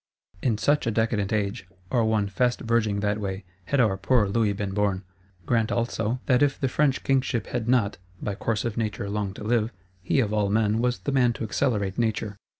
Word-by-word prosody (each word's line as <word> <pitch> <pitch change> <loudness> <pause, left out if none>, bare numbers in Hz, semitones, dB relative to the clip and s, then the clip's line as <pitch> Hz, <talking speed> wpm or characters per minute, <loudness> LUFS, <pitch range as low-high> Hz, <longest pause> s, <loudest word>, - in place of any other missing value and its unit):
In 115 -4 +1
such 145 +5 +2
a - - +2
decadent 110 -2 0
age, 100 -3 -1 0.2
or 120 -2 +3
one 110 -2 +1
fast 125 +5 0
verging 110 -3 +1
that 105 0 0
way, 95 -1 -4 0.2
had 140 - 0
our 105 -6 +3
poor 105 +2 +2
Louis 105 +1 +1
been 100 -1 -3
born. 100 -1 0 0.4
Grant 115 -3 +1
also 115 0 -1
that 125 -2 +3
if 145 -2 +2
the 135 - +1
French 135 +1 +1
Kingship 130 -3 +1
had 120 -1 -3
not, 115 -7 +2 0.2
by 105 - -3
course 110 +2 -2
of 115 -1 -3
Nature, 105 -3 -2
long 105 -2 -1
to - - -8
live, 115 0 +1 0.3
he 95 - +1
of 110 -4 +1
all 105 -2 +1
men 110 +1 +2
was 125 +1 +1
the 140 - -3
man 125 -3 +3
to - - -6
accelerate 105 -2 0
Nature. 110 -2 -1
110 Hz, 205 wpm, -26 LUFS, 105-120 Hz, 0.4 s, or